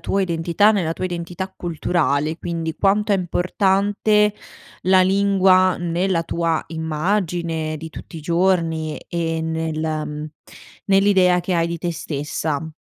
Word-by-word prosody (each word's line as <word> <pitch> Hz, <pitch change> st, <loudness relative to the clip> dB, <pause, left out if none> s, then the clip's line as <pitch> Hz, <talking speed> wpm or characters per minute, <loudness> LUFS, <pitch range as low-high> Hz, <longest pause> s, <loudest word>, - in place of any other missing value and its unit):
tua 195 Hz, 0 st, 0 dB
identità, 170 Hz, +4 st, +2 dB
nella 175 Hz, -6 st, 0 dB
tua 175 Hz, -, -5 dB
identità 175 Hz, +1 st, -4 dB
culturale, 160 Hz, -2 st, 0 dB
quindi 165 Hz, -2 st, -4 dB
quanto 205 Hz, +4 st, +2 dB
è -, -, +5 dB
importante 200 Hz, +3 st, +1 dB, 0.5 s
la 185 Hz, +1 st, +5 dB
lingua 190 Hz, -1 st, +4 dB
nella 175 Hz, 0 st, 0 dB
tua 165 Hz, -1 st, -1 dB
immagine 160 Hz, 0 st, -2 dB
di 160 Hz, +1 st, -8 dB
tutti 165 Hz, -, -10 dB
i 160 Hz, -, -6 dB
giorni 165 Hz, -2 st, 0 dB
e 165 Hz, -2 st, -2 dB
nel 160 Hz, -1 st, -2 dB
mhmm, 155 Hz, -1 st, -3 dB, 0.6 s
nell'idea 195 Hz, -2 st, +4 dB
che 180 Hz, +1 st, -2 dB
hai 165 Hz, -1 st, +2 dB
di 170 Hz, 0 st, -4 dB
te 170 Hz, +1 st, -2 dB
stessa? 155 Hz, 0 st, -3 dB
170 Hz, 130 wpm, -21 LUFS, 160-190 Hz, 0.6 s, è